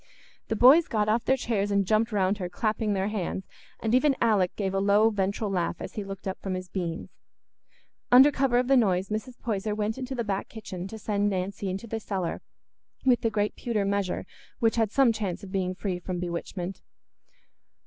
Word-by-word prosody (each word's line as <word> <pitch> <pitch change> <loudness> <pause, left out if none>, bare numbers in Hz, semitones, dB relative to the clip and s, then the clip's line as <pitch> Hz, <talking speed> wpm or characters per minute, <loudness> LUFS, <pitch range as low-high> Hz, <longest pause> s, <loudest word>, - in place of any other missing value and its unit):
The 220 - -1
boys 270 +9 +7
got 210 -2 0
off 225 +2 +1
their 265 - +3
chairs 215 -5 -1
and 200 -1 +2
jumped 220 +3 +2
round 200 0 +1
her, 180 -2 -3
clapping 215 +3 -1
their 195 +1 0
hands, 190 -2 -3 0.3
and 225 0 -1
even 275 +2 +4
Alick 205 -6 +2
gave 195 -2 -2
a 195 - +1
low 205 +3 +4
ventral 200 +1 -1
laugh 180 -3 0
as - - -7
he 210 - -4
looked 195 0 -7
up 190 - -4
from 190 -1 -3
his 185 0 -6
beans. 170 -4 -4 1.0
Under 265 +4 +8
cover 265 -3 +2
of 250 0 +2
the 270 - +5
noise, 190 -6 +2
Mrs. 220 +3 -4
Poyser 210 -2 -2
went 215 +3 -2
into 265 0 -4
the 235 - -1
back 200 -2 -3
kitchen 190 -5 -7
to 220 - -8
send 205 -1 0
Nancy 195 +1 -3
into 190 +4 -4
the 225 0 -4
cellar 190 -5 -3 0.6
with 250 -2 +4
the 225 - +1
great 210 -1 -1
pewter 220 -4 -1
measure, 200 -2 -1 0.3
which 225 -3 +2
had 220 -3 +2
some 265 -3 +4
chance 205 -3 -3
of 190 - -9
being 185 -2 -1
free 185 -2 -3
from 180 0 -4
bewitchment. 180 +1 -4
205 Hz, 200 wpm, -27 LUFS, 190-225 Hz, 1.0 s, Under